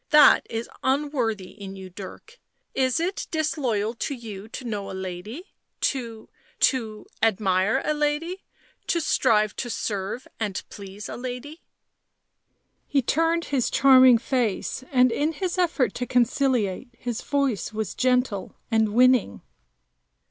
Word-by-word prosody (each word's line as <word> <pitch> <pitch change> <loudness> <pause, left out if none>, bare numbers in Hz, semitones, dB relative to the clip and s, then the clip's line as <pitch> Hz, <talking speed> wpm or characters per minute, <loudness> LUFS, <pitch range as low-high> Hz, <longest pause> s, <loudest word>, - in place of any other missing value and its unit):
" - - -51
That 300 -1 +7
is 230 0 -3
unworthy 260 -8 0
in 195 -1 -9
you, 190 -1 -10
Dirk 205 - -11 0.2
— - - -49
is 255 - 0
it 360 +4 -2
disloyal 265 - -1
to 260 +4 -3
you 215 -4 -8
to 250 +3 -8
know 205 -4 -4
a 190 - -6
lady 190 - -7
— - - -52
to 230 -5 -7 0.2
— - - -34
to 220 -5 -5
— - - -33
admire 210 +2 +2
a 305 - +1
lady, 300 +5 -1 0.4
to 340 - +1
strive 215 -9 +2
to 245 - -3
serve 205 +2 -3
and 205 -3 -2
please 200 0 -8
a - - -6
lady 255 +6 -7 0.6
" - - -53 0.5
He 275 -2 +1
turned 330 +5 +1
his 255 -4 +2
charming 260 -2 +7
face, 245 -1 -1
and 255 -2 +5
in 295 +7 0
his 365 +1 -3
effort 315 - +1
to 245 - -4
conciliate, 245 -3 +1
his 240 -3 -4
voice 275 -9 -1
was 215 -3 -3
gentle 250 -6 0 0.2
and 220 -1 +2
winning. 250 - +4
245 Hz, 150 wpm, -25 LUFS, 210-280 Hz, 0.6 s, That